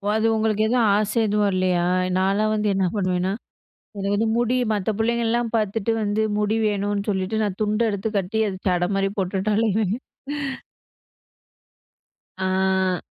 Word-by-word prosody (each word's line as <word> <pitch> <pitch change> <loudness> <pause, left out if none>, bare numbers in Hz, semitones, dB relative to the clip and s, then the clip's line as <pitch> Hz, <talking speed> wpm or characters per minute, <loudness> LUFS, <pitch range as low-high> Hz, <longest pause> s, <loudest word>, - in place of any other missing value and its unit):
அது 220 0 +1
உங்களுக்கு 215 -1 +1
எதும் 235 -1 +3
ஆச 210 0 +1 0.2
எதுவும் 210 0 +2
வரலயா! 185 -3 +1 0.3
நான்லாம் 200 +3 +2
வந்து 210 0 0
என்ன 195 -1 +1
பண்ணுவேன்னா, 185 -2 0 0.7
எனக்கு 200 0 -1
வந்து 225 +2 +1
முடி 240 +1 +1 0.2
மத்த 210 0 0
புள்ளைங்கள்லாம் 235 0 0
பாத்துட்டு 215 +1 0
வந்து, 210 +1 0 0.2
முடி 210 +1 +1
வேணுன்னு 205 -1 -1
சொல்லிட்டு 195 +2 -1
நான் 200 -3 -2
துண்ட 215 +2 +1
எடுத்து 200 +2 -2
கட்டி 195 +3 -2
அத 190 - -4
சட 180 -1 +1
மாரி 195 0 +1
போட்டுட்டு 195 +2 0
அலைவேன். 215 -2 +1 2.4
ஆ. 190 -1 +1
205 Hz, 135 wpm, -23 LUFS, 190-220 Hz, 2.4 s, எதும்